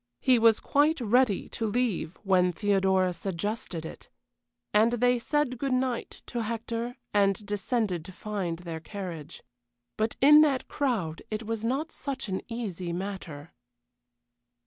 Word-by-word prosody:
He 255 -2 +4
was 225 -1 +5
quite 300 +2 +2
ready 235 -3 +2
to 225 - -2
leave 215 -6 -1
when 185 -2 +3
Theodora 190 -1 +2
suggested 185 -1 -4
it, - - -10 0.6
and 220 +3 +4
they 245 +1 +3
said 265 -1 0
good 270 -1 +1
night 255 -2 -2
to 240 - -3
Hector 230 +2 -3 0.2
and 200 0 +2
descended 205 -3 -1
to 190 - -9
find 185 -4 -3
their 170 -2 -6
carriage. 170 -4 -7 0.5
But 220 +1 0
in 300 +3 +8
that 280 -4 +2
crowd 215 - -1
it 215 +1 -3
was 225 0 -3
not 275 +7 -1
such 270 -4 -4
an 190 - -2
easy 195 -7 -4
matter. 175 -5 -6
215 Hz, 140 wpm, -28 LUFS, 185-245 Hz, 0.6 s, in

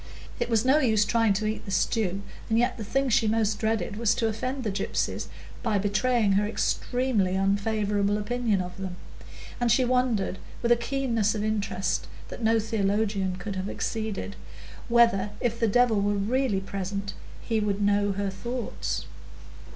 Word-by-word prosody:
It - - -1
was 225 0 +2
no 270 +4 +5
use 220 -6 +3
trying 225 -1 +3
to 210 +2 -1
eat 215 +1 -2
the - - -7
stew, 195 0 0 0.3
and 225 - +2
yet 240 +1 +2
the - - -3
thing 270 +6 0
she 235 -1 +3
most 215 -1 +1
dreaded 220 -3 -1
was 230 0 +2
to 230 - +1
offend 255 +5 -3
the 215 - -1
gypsies, 195 0 -2 0.3
by 220 -4 +1
betraying 210 +2 +2
her 205 +2 +2
extremely 225 -3 0
unfavourable 205 +1 +1
opinion 215 -1 0
of 180 0 -6
them; 190 -2 -5 0.6
and 240 -1 +2
she 255 +3 +4
wondered, 245 -6 +1 0.2
with 235 - +2
a - - +8
keenness 235 -4 0
of 210 - -2
interest 195 -4 -1 0.2
that - - -8
no 225 +1 +4
theologian 205 -3 0
could 190 +2 -5
have 190 +1 -3
exceeded, 215 -2 -3 0.5
whether, 230 -4 +4
if 235 -2 -1
the 230 - +3
Devil 225 -1 +3
were 205 +1 +1
really 210 0 0
present, 195 +1 -4 0.3
he 225 -2 -1
would 205 -1 0
know 205 0 +2
her 200 0 -2
thoughts. 240 +4 -4
215 Hz, 165 wpm, -27 LUFS, 200-235 Hz, 0.6 s, a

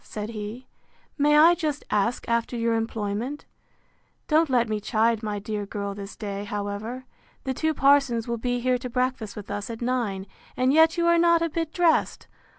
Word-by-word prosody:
said 210 0 -6
he, 220 +3 -7 0.5
May 295 +1 +4
I 325 +3 +8
just 310 -4 -2
ask 210 +4 0
after 235 +1 0
your 230 0 +1
employment? 225 +4 -3 0.8
Don't 315 0 +3
let 240 -2 +2
me 215 -1 -1
chide 220 +2 +1
my 210 -2 -3
dear 205 0 -4
girl 200 -1 -4
this 200 0 -8
day, 200 -2 -5
however. 205 +5 -5 0.4
The 265 - -2
two 315 +4 -1
parsons 275 -5 +3
will 235 -1 -2
be 245 +1 -1
here 250 0 +1
to 250 0 -6
breakfast 250 -3 -2
with 210 -2 -8
us 205 +1 -4
at 225 -1 -6
nine; 235 -6 -1 0.3
and 255 +2 +3
yet 320 +2 +5
you 340 - +2
are 340 0 +4
not 340 0 +4
a 335 - -1
bit 325 0 -2
dressed! 340 -2 +1
235 Hz, 185 wpm, -25 LUFS, 210-285 Hz, 0.8 s, I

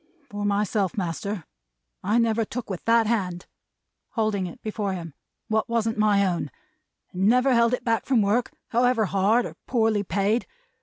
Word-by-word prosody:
For 205 0 -3
myself, 205 -1 0
master, 190 +1 -3 0.6
I 210 +4 +2
never 230 -1 +2
took 225 0 -6
with 185 - -5
that 230 0 +4
hand" 185 -6 -1 0.7
holding 215 -5 0
it 170 - -10
before 210 -2 -2
him 165 -4 -6 0.3
"what 220 0 0
wasn't 225 -2 0
my 205 -2 +4
own; 175 -5 -1 0.6
and 190 +2 0
never 250 +3 +4
held 235 -1 +4
it 245 - -13
back 230 -1 0
from 245 -6 +3
work, 215 +5 +1 0.2
however 245 -1 +2
hard, 200 +5 +2
or - - -6
poorly 225 -4 +2
paid. 205 +4 0
215 Hz, 160 wpm, -25 LUFS, 195-230 Hz, 0.7 s, that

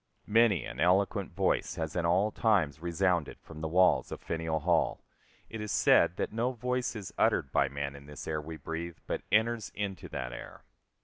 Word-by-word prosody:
Many 105 - +3
an - - -8
eloquent 95 +3 +2
voice 95 +2 0
has 80 -1 -4
in 85 -1 +1
all 95 +5 +2
times 90 - +1
resounded 85 -1 0
from 80 -1 -11
the 80 - -1
walls 90 +3 +3
of - - -5
Faneuil 80 -1 -2
Hall. 85 +1 +1 0.4
It 110 - -7
is 105 -2 -4
said 85 - +4
that - - -2
no 120 +3 0
voice 125 +1 -2
is 100 -4 -7
uttered 70 - +2
by 70 - +2
man 70 0 -4
in 70 0 -12
this 75 0 -9
air 75 -1 -1
we 80 +1 -8
breathe 80 +3 -5
but - - -3
enters 110 +1 +2
into 100 -2 -4
that - - -5
air. - - -10
85 Hz, 190 wpm, -30 LUFS, 80-105 Hz, 0.4 s, said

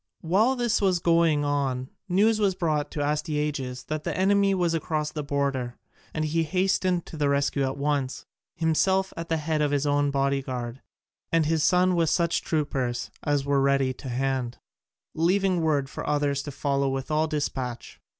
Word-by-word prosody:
While 210 +10 +2
this 240 -4 +1
was 190 -3 +3
going 165 -3 +3
on 135 -3 -1 0.2
news 215 +4 +3
was 200 -3 +2
brought 155 -5 0
to 145 - -3
Astyages 150 -4 -2
that 155 0 -4
the - - -3
enemy 195 +1 +3
was 175 -2 +1
across 155 -1 -1
the 150 - -4
border, 140 -4 -2 0.3
and 155 0 -2
he 160 +2 0
hastened 185 +1 +1
to 160 - -9
the 145 -1 +1
rescue 140 0 +1
at 130 - -3
once, 140 -2 -1 0.3
himself 190 +4 +1
at 165 0 -6
the 165 - +1
head 155 0 -1
of 150 - +2
his 145 0 0
own 145 0 +2
body 140 0 +1
guard, 125 -1 -5 0.5
and 165 -1 +3
his 160 0 +1
son 180 +1 +4
with 165 -2 +2
such 170 0 +1
troopers 135 -6 -2
as 145 -2 0
were 140 -1 +2
ready 135 -1 +2
to 130 +1 -9
hand, 130 -1 -1 0.6
leaving 185 +2 +2
word 145 -4 +1
for - - -7
others 145 -1 +1
to 145 - -7
follow 140 0 0
with 135 +2 -3
all 155 +1 +2
despatch. 130 -5 -4
150 Hz, 180 wpm, -26 LUFS, 140-170 Hz, 0.6 s, son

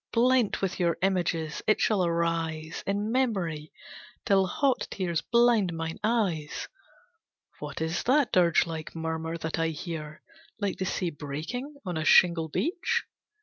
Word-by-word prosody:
Blent 245 -3 +2
with 195 - -1
your 170 -2 +1
images, 170 -5 0
it 215 - +4
shall 205 -4 +2
arise 165 -2 -1
In 205 +2 -1
memory, 185 -12 -1 0.5
till 195 -3 +4
the 190 - +1
hot 275 - +1
tears 175 -4 -1
blind 235 -6 +3
mine 165 0 -4
eyes! 195 -10 0 0.9
What - - -6
is 160 +2 -1
that 270 0 +3
dirge 175 -2 +4
like 160 -1 -6
murmur 160 0 -3
that 160 -1 -3
I 165 - +2
hear 155 -1 -6 0.4
Like 200 -2 -2
the 190 - -1
sea 180 -1 -1
breaking 165 - -5
on 180 -3 -3
a 155 - -1
shingle 165 0 +5
beach? 380 - 0
175 Hz, 145 wpm, -28 LUFS, 160-215 Hz, 0.9 s, shingle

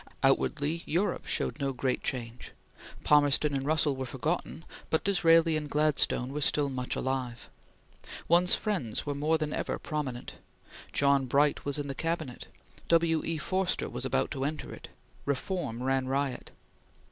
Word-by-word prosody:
Outwardly 145 +4 +2
Europe 180 +6 0
showed - - -1
no 135 -1 -1
great 130 0 -1
change. 120 -2 -4 0.5
Palmerston 145 0 +4
and 135 0 -2
Russell 155 -2 +2
were 130 0 -4
forgotten; 160 +6 -3 0.2
but 160 - +1
Disraeli 165 -4 +4
and 150 -1 -3
Gladstone 145 -3 +2
were 150 - -3
still 145 0 +2
much 130 -2 -2
alive. 130 -3 -3 0.8
One's 175 +2 +5
friends 175 - -2
were 145 - -1
more 150 +3 +1
than 155 -1 -3
ever - - -2
prominent. 140 -6 -5 0.5
John 140 -1 +3
Bright 145 +3 +2
was 140 0 -1
in 145 -1 -3
the 140 - -3
Cabinet; 160 -4 -3 0.4
W. 165 -1 +3
E. 165 -1 -2
Forster 185 +4 -1
was - - -5
about 130 0 0
to 135 -2 -3
enter 150 +3 -3
it; - - -10 0.4
reform 140 -3 -2
ran 135 0 +1
riot. 135 -1 -2
145 Hz, 150 wpm, -29 LUFS, 135-160 Hz, 0.8 s, One's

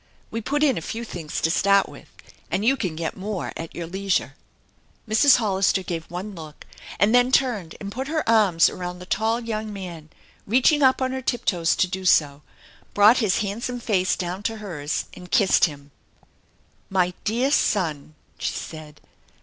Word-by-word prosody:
We 230 - -3
put 290 +6 0
in 270 - +3
a - - -11
few 225 +8 -5
things 175 -9 -5
to 160 - +2
start 200 +2 +3
with, - - -13 0.4
and 205 - -1
you 265 +4 +4
can 185 -11 -3
get 165 0 -3
more 195 0 -4
at 165 0 -7
your 170 - -4
leisure." 190 +2 -1 0.7
Mrs. 225 +7 +5
Hollister 195 -4 +1
gave 165 -2 -4
one 185 +4 -6
look, 155 -4 -11 0.3
and 205 +5 +3
then 245 +1 +4
turned 225 -12 +1
and 200 -1 -6
put 260 +5 -4
her 310 +1 -2
arms 205 -7 +4
around 180 0 -5
the 180 - -10
tall 220 +4 0
young 220 -2 -4
man, 175 -6 -8 0.4
reaching 260 +7 +3
up 260 -1 +4
on 260 - -1
her 260 0 -3
tip 240 -1 -2
toes 170 -3 +2
to - - +2
do 190 +1 -5
so, 150 -5 +3 0.5
brought 210 +4 +7
his 210 -4 +1
handsome 230 +5 -3
face 190 -5 +1
down 180 +2 -4
to 225 +2 -3
hers, 165 -8 -4
and 180 0 -12
kissed 195 -3 +4
him. 145 -3 -8 0.5
" - - -38
My 180 0 +2
dear 240 +6 0
son! 155 - 0
" - - -38
she - - -2
said. 155 -2 -9
195 Hz, 185 wpm, -23 LUFS, 170-230 Hz, 0.7 s, brought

